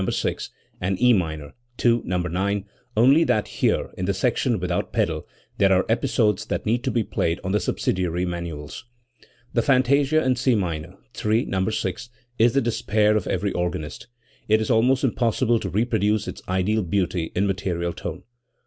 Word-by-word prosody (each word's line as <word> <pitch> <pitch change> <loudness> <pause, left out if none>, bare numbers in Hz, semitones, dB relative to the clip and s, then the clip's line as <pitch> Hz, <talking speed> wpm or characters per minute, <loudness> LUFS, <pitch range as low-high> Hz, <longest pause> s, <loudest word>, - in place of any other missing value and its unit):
6) - - -2 0.3
and' 95 +1 -1
E 125 +1 +5
minor 80 -7 -2 0.3
(II, 120 -1 +4
No, 90 +1 -1
9), 95 +3 -1 0.3
only 135 +8 +6
that 110 -9 +1
here, - - 0
in 90 - -3
the 100 +1 0
section 120 +1 +1
without 90 0 -2
pedal, 80 -2 -1 0.3
there 95 -1 +4
are 95 0 +3
episodes 110 -4 +1
that - - -3
need 115 +3 +1
to - - +1
be 115 - +1
played 85 -3 -1
on 95 - -2
the 105 - +2
subsidiary 90 -3 -1
manuals. 85 -1 -6 0.7
The 120 - +3
fantasia 140 +4 +3
in 130 -1 +1
C 130 0 +2
minor 85 -3 -3 0.3
(III, 110 +2 +2
No. 95 +1 -1
6) 110 +2 -3 0.3
is 115 +1 +5
the 140 - +3
despair 110 -2 +1
of 105 - -1
every 100 +2 -1
organist. 85 0 -4 0.4
It 110 +1 +4
is 110 +2 -1
almost 125 +4 +3
impossible 115 -2 +1
to 95 - -4
reproduce 105 0 +1
its - - -6
ideal 95 +4 +1
beauty 90 -2 -1
in 95 - +2
material 90 -3 -2
tone. 85 +2 -6
100 Hz, 170 wpm, -23 LUFS, 90-115 Hz, 0.7 s, only